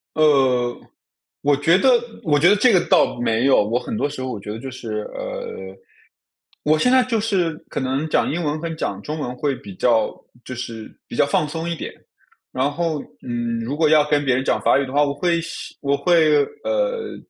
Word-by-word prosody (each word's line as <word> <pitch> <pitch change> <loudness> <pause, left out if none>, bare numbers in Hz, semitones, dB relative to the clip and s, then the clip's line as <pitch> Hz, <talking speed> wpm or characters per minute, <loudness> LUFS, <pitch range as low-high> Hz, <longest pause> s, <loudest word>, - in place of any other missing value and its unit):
呃， 130 -5 +3 0.7
我 145 0 +3
觉 160 +5 +3
得 265 - +3 0.3
我 145 -3 +2
觉 170 +4 +6
得 205 - +5
这 220 +3 +4
个 180 - +4
倒 - - +3
没 115 0 +1
有， 135 -5 +5
我 115 +4 0
很 225 - -5
多 145 -9 0
时 140 -2 -7
候 130 0 -3
我 110 - -5
觉 105 - -7
得 110 - -6
就 135 +3 -6
是， 110 -4 -5
呃， - - -6 0.9
我 155 +1 +3
现 250 +10 +2
在 260 0 +5
就 240 -3 -1
是 190 -6 0 0.2
可 - - -3
能 135 +4 -1
讲 - - +2
英 170 +3 -2
文 150 0 -1
跟 165 0 -4
讲 100 -10 -3
中 155 +7 -5
文 125 -4 -4
会 140 +1 -1
比 100 -6 -11
较 115 +2 +2 0.3
就 130 - -7
是 115 -2 -7 0.2
比 - - -8
较 - - +4
放 150 +1 +1
松 165 +2 -4
一 170 - -2
点。 - - -7 0.6
然 135 +3 0
后， 165 0 -2 0.2
嗯， 120 -1 -3
如 135 +6 -4
果 160 0 +3
要 155 0 +5
跟 145 -1 +2
别 130 - +3
人 130 +1 0
讲 - - +1
法 - - +4
语 140 - 0
的 - - -8
话， 145 +1 +4
我 140 -1 0
会 170 +3 0
希 170 - -8
我 140 0 +1
会， 155 -3 +4 0.2
呃， - - -1
145 Hz, 235 characters per minute, -21 LUFS, 125-170 Hz, 0.9 s, 觉